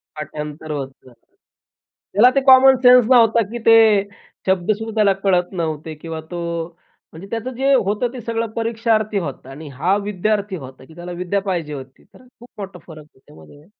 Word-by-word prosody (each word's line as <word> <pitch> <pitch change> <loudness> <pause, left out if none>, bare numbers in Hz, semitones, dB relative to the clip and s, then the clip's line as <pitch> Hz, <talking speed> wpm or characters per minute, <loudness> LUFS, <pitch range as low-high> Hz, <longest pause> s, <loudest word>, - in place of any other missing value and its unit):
पाठांतर 150 +1 -7
होतं 135 -3 -7
जात. 125 - -18 1.0
त्याला 230 +6 +6
ते 275 - +3
कॉमन 265 0 +8
सेन्स 250 -2 +7
नव्हतं 230 -4 +4
की 240 - -4
ते 225 0 +7 0.7
शब्द 190 +1 +1
सुद्धा 220 +1 -4
त्याला 210 -3 +3
कळत 180 -2 +1
नव्हते 155 0 -4
किंवा 165 -1 -6
तो 175 -1 -4 0.7
म्हणजे 165 +5 -11
त्याचं 230 +3 -4
जे 270 +2 +2
होतं, 215 -1 +1
ते 250 - -7
सगळं 230 0 -3
परीक्षार्थी 225 -2 0
होतं 140 -6 -7
आणि 150 +3 -10
हा 175 +9 +1
विद्यार्थी 205 0 -2
होता 130 -4 -11
की 160 - -17
त्याला 175 +1 -8
विद्या 180 +3 -2
पाहिजे 175 -6 -3
होती. 135 -1 -10
तर - - -21 0.2
खूप 240 +1 -15
मोठा 195 -1 -8
फरक 155 -2 -11
आहे 145 - -28
त्यामध्ये. 80 - -17
195 Hz, 175 wpm, -19 LUFS, 155-225 Hz, 1.0 s, कॉमन